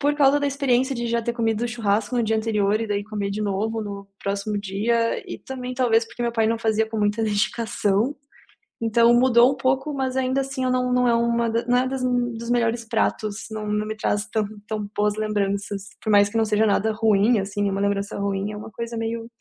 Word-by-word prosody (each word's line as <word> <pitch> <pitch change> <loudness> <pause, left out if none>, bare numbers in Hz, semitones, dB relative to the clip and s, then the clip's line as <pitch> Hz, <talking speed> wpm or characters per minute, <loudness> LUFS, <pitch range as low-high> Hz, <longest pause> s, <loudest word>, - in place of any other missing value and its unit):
por 290 +1 +2
causa 285 0 +4
da 285 - +1
experiência 270 -1 +1
de 235 -1 -3
já 235 0 0
ter 235 +1 -1
comido 225 -1 0
o 240 - 0
churrasco 220 0 0
no 240 - +2
dia 220 0 +1
anterior, 215 -1 +1
e 225 - -2
daí 205 -1 -2
comer 205 -2 -3
de 210 +2 -3
novo 210 +2 -1
no 200 -1 -7
próximo 200 +1 -2
dia, 225 +4 0
e - - -5
também 255 -1 -6
talvez 240 -3 +2
porque 235 - -13
meu 235 0 0
pai 225 -1 +2
não 230 0 0
fazia 220 -1 +1
com 220 - -3
muita 210 +2 +1
dedicação. 215 +2 0 0.7
Então 230 +1 +4
mudou 240 0 +5
um - - -7
pouco, 265 +3 0
mas 265 -1 -2
ainda 260 +1 +1
assim, 270 -1 -4
eu 255 - +1
não 250 0 +1
não 250 0 +3
é 235 - +4
uma 235 0 +1
da 230 +1 -1
não 245 0 +3
é 255 +1 +2
das 265 -1 -3
dos 240 -2 -1
melhores 235 -1 +1
pratos. 220 -2 -1
Não 215 -1 -5
não 210 0 0
me 215 0 -4
traz 210 -1 -1
tã 220 -1 0 0.2
tão 210 -2 -4
boas 210 0 +1
lembranças. 200 -2 -2 0.2
Por 220 - -3
mais 205 -1 +5
que 225 - -3
não 225 - +3
seja 215 +1 +2
nada 215 +1 +2
ruim, 215 0 +3
assim, 200 +1 -1
uma 195 0 -2
lembrança 200 0 -1
ruim, 200 0 -2
é 210 - -7
uma 215 +1 -9
coisa 235 +1 -5
meio: 225 0 -3
"É, - - -11
225 Hz, 230 wpm, -23 LUFS, 210-240 Hz, 0.7 s, mudou